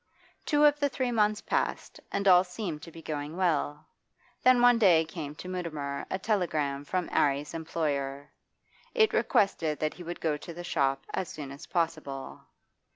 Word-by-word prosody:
Two 295 -1 +3
of 295 0 +4
the 285 -1 +2
three 255 -2 -1
months 215 -1 +2
passed, - - -2
and 200 0 -1
all 180 -1 +8
seemed 180 -4 -5
to 165 - -10
be 165 0 -12
going 150 +2 -4
well. 155 -4 0 0.6
Then 255 -1 +6
one 245 -1 +6
day 175 -7 +6
there 160 - -13
came 150 -4 -5
to 180 - -9
Mutimer 155 -6 -4
a - - -1
telegram 155 -9 -1
from 180 +4 -1
'Arry's 145 +1 +1
employer; 145 -4 -3 0.6
it 440 -2 +4
requested 160 -6 +2
that 155 0 -1
he - - -12
would 175 +1 -6
go 155 -2 0
to 165 +2 -9
the 175 - -7
shop 135 -5 0
as 185 - -2
soon 145 -3 -7
as 140 - -10
possible. 155 -6 -3
165 Hz, 175 wpm, -29 LUFS, 145-190 Hz, 0.6 s, all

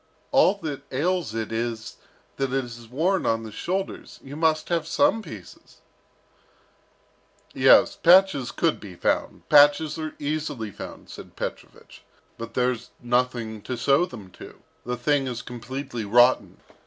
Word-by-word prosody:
"All 270 -8 +5
that 145 -3 -4
ails 165 -2 -1
it 115 0 -3
is, 115 -1 -4 0.4
that 135 -1 -1
it 135 -1 0
is 120 -1 -11
worn 170 +10 0
on 115 0 0
the 110 - -8
shoulders. 190 - -4
You 140 +1 -9
must 155 0 +1
have 165 -2 0
some 285 - +2
pieces 110 - -12 0.9
" - - -35
"Yes, - - +5
patches 175 -7 +5
could 165 -2 0
be 95 -4 -10
found, - - -2
patches 150 +2 +5
are 155 -1 -5
easily 145 -7 -3
found," - - -10
said - - -11
Petrovich, - - -8 0.4
"but 115 0 -8
there's 125 -2 0
nothing 120 -3 -1
to 125 - -5
sew 140 +8 +3
them 105 - -11
to. - - -13 0.2
The 125 0 -2
thing 135 +2 +1
is 120 -2 -5
completely 125 0 -6
rotten. 120 +5 +3
130 Hz, 145 wpm, -25 LUFS, 115-155 Hz, 0.9 s, All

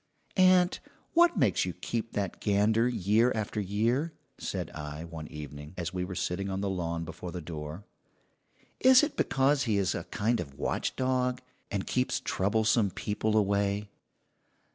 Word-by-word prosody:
"Aunt, 185 -1 +5 0.3
what 345 0 +5
makes - - +3
you - - -3
keep 115 -1 -4
that 100 -3 -3
gander 110 +3 +3
year 115 +1 +3
after 110 -1 -2
year?" 115 - 0 0.3
said - - -4
I 75 0 -6
one 80 -2 -7
evening, 75 +2 -9
as 85 0 -3
we 90 -1 -1
were 90 0 -5
sitting 95 +3 -2
on 95 0 -2
the 100 0 -1
lawn 85 -2 -2
before 90 +2 -7
the 90 - -5
door. 80 +3 -7 0.9
"Is 260 +2 +7
it 295 - -1
because 135 +1 +2
he 110 -4 +1
is 95 -2 +1
a 85 - -4
kind 110 +6 0
of 70 -5 -6
watchdog, 125 -1 0 0.3
and 100 -2 -2
keeps 125 0 0
troublesome 110 +2 +2
people 105 +3 -1
away?" 100 0 +1
100 Hz, 155 wpm, -29 LUFS, 90-120 Hz, 0.9 s, Is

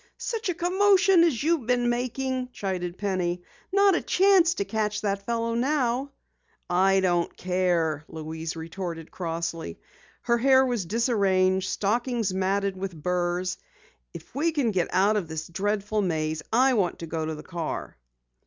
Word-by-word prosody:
"Such 455 -4 -3
a 355 - -1
commotion 380 +1 +4
as 290 -8 +1
you've 315 -7 +1
been 245 -1 +2
making," 255 +1 -2
chided 180 -2 -3
Penny. 180 -3 -1 0.3
"Not 400 0 +5
a 345 - +1
chance 370 -2 +4
to 200 - -2
catch 210 +1 -1
that 200 -1 -2
fellow 230 0 -1
now!" 260 +1 0 0.6
"I 190 +2 +3
don't 175 -2 0
care," 175 -5 0
Louise 160 +1 -6
retorted 165 0 -6
crossly. 165 - -4 0.4
Her 235 -1 +2
hair 265 +1 +5
was 240 -8 -2
disarranged, 190 -4 +2
stockings 230 -1 0
matted 195 +1 0
with 190 -1 -5
burs. 180 +2 -1 0.5
"If - - -11
we 310 +6 +1
can 280 -8 +1
get 180 -4 0
out 205 +3 +3
of 190 -5 -2
this 160 0 -5
dreadful 205 +4 -1
maze 160 -4 -1
I 255 +4 +4
want 190 -7 +1
to 170 - -6
go 160 0 -3
to 155 0 -3
the 150 - -10
car." 165 -2 -5
200 Hz, 155 wpm, -26 LUFS, 175-250 Hz, 0.6 s, Not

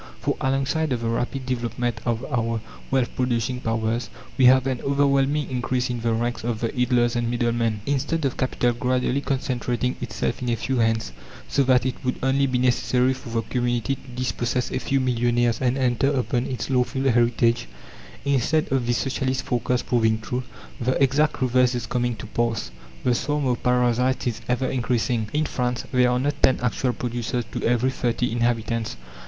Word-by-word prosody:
For - - -1
alongside 135 +3 0
of 120 - -2
the 115 - -1
rapid 125 +3 -2
development 120 -2 -2
of 120 +2 0
our 115 -4 -1 0.3
wealth 130 -2 0
producing 125 -1 0
powers 115 0 -1 0.3
we 130 - +4
have 130 +1 +6
an 130 -2 -1
overwhelming 140 +1 +2
increase 125 0 -1
in 120 - -3
the 115 0 +1
ranks 120 +1 -1
of 115 -2 -2
the 115 +3 -2
idlers 125 -1 +2
and 120 -1 0
middlemen. 115 -2 0
Instead 145 +3 0
of 135 - 0
capital 125 -1 +1
gradually 125 +2 0
concentrating 125 -2 -1
itself 110 0 -2
in 125 - -2
a 120 - +2
few 130 +3 -2
hands, 115 - +1 0.4
so 140 - +1
that 125 -1 +4
it 130 +2 -3
would 125 -1 0
only 135 +1 +3
be 130 -1 0
necessary 125 +1 +2
for 130 -2 -9
the 115 0 -1
community 120 +2 0
to - - -8
dispossess 125 0 -1
a - - -1
few 135 - 0
millionaires 120 -2 +1
and 130 +1 +1
enter 130 +1 +2
upon 125 -2 0
its 130 +1 -4
lawful 130 +1 +1
heritage 120 - +2 0.6
instead 140 +3 +1
of 130 -3 +1
this 120 0 +2
Socialist 130 +1 -1
forecast 125 0 -1
proving 110 -2 +2
true, 125 +3 -3 0.4
the 125 +2 +1
exact 140 +2 +2
reverse 125 0 +3
is 120 - -3
coming 120 -1 -1
to 110 - -8
pass: 115 -1 -1 0.3
the 125 - +3
swarm 145 +3 -1
of 125 -2 0
parasites 125 +1 +2
is 120 -3 -2
ever 125 +1 +1
increasing. 120 -3 0
In 155 +1 +1
France 125 -3 -2
there 125 -1 +4
are 125 - +2
not 145 +3 -1
ten 130 - +4
actual 125 +1 0
producers 120 0 -3
to 120 - -4
every 125 +2 +2
thirty 125 -1 -1
inhabitants. 115 - -1
125 Hz, 180 wpm, -24 LUFS, 120-130 Hz, 0.6 s, have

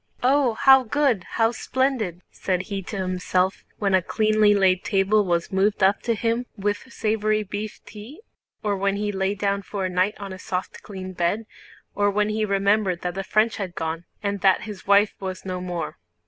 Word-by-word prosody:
"Oh, 260 -2 +3
how 265 +3 +7
good! 250 - +1
How 225 0 +3
splendid!" 240 -7 -1
said 185 -1 -2
he 195 - -2
to 200 +2 -6
himself 185 0 0
when 200 -2 0
a 190 - +5
cleanly 215 +2 +3
laid 190 -2 +3
table 200 +2 +2
was 170 -2 -1
moved 200 +1 +1
up 195 +1 +4
to 230 -1 0
him 230 +3 -1
with 205 +6 -2
savory 215 -1 0
beef 205 +2 -6
tea, 225 - -11 0.4
or 205 -1 +1
when 195 +1 0
he 205 0 -1
lay 195 0 -1
down 200 0 0
for 195 -1 -3
the 180 - -7
night 185 +3 +1
on 200 -2 -6
a 185 - -9
soft 185 0 -4
clean 190 -2 -8
bed, 180 +5 -1 0.5
or 205 0 +2
when 210 +1 +1
he 215 0 0
remembered 200 -2 +1
that 180 0 -2
the 195 +2 -4
French 215 +3 +1
had 190 -4 -5
gone 160 +1 -3 0.2
and 200 -1 -2
that 190 -2 +4
his 210 -3 -9
wife 200 +1 +5
was 190 -1 -6
no 185 -1 -4
more. 175 -4 -4
200 Hz, 190 wpm, -24 LUFS, 185-215 Hz, 0.5 s, how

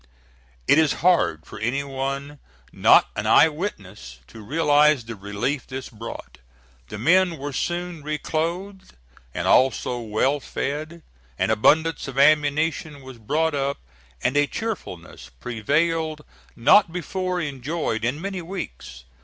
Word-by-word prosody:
It 155 - +6
is 155 -3 +3
hard 165 - +3
for - - -10
any 125 +6 -1
one 140 +1 -4 0.3
not - - +5
an - - -2
eye 160 - +6
witness 100 - -7
to 110 - -12
realize 145 +1 +3
the 115 0 -7
relief 100 +8 -3
this 130 0 -6
brought. 115 - -9 0.5
The 105 - -6
men 175 - +3
were 145 0 -6
soon 175 +2 -3
reclothed 170 +6 -4 0.4
and - - -3
also 125 -1 +3
well 120 +6 0
fed, 155 +5 -5 0.3
an - - +1
abundance 155 +8 +2
of 135 -1 -8
ammunition 150 0 +2
was 130 -2 -11
brought 155 +8 0
up, 140 0 -1 0.5
and 125 +2 +1
a 145 0 +3
cheerfulness 90 - -6
prevailed 155 - -1 0.3
not 165 - +5
before 180 +2 -3
enjoyed 140 -5 -3
in 125 +5 -1
many 190 +1 -4
weeks. 165 - -8
145 Hz, 130 wpm, -23 LUFS, 125-165 Hz, 0.5 s, It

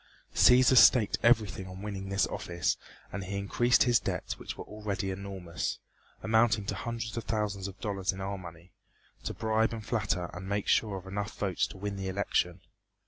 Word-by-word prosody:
Cæsar 130 +1 +6
staked 110 -4 +6
everything 110 -5 +3
on 95 +1 -9
winning 95 -2 -5
this 100 0 +2
office 85 -2 -1 0.4
and 100 - -4
he 100 +1 -4
increased 120 +5 +3
his 120 -2 +4
debts, - - -4
which - - -7
were - - -6
already 105 -2 -4
enormous, 95 -3 -4 0.5
amounting 110 0 +3
to 100 - -2
hundreds 115 +1 -4
of 115 - -4
thousands 105 -3 -2
of 95 - -10
dollars 100 -4 -1
in 95 - -9
our 100 0 -3
money, 85 0 -12 0.5
to - - -3
bribe 110 0 +1
and 110 -2 -6
flatter 105 -6 -1
and 95 +2 -7
make 100 0 -1
sure 105 -3 +2
of 95 - -9
enough 100 +2 -4
votes 95 -4 0
to 100 - -11
win 100 +1 -4
the 95 0 -4
election. 95 -2 0
100 Hz, 185 wpm, -30 LUFS, 95-110 Hz, 0.5 s, Cæsar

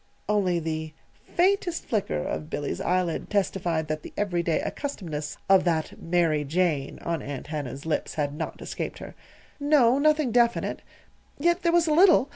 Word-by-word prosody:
Only 195 -4 +2
the 160 -1 -3 0.4
faintest 360 -1 +2
flicker 205 - -1
of 75 0 -4
Billy's 145 - -3
eyelid 180 -2 0
testified 175 -5 0
that 155 0 -2
the - - -10
everyday 175 -5 0
accustomedness 160 - -4
of 190 -1 +6
that 160 -3 -1
"Mary 165 -3 +2
Jane" 150 -2 0
on 170 -3 -2
Aunt 140 -1 -6
Hannah's 145 -2 -5
lips 160 -2 -2
had 145 -2 -1
not 150 - -5
escaped - - -4
her. - - -9 0.5
"No, 280 -3 +4
nothing 305 -3 +3
definite. 235 0 +2 0.6
Yet 345 +4 +2
there 340 - +2
was 340 -1 +4
a 310 - +2
little. 335 -5 +6
175 Hz, 155 wpm, -26 LUFS, -, 0.6 s, of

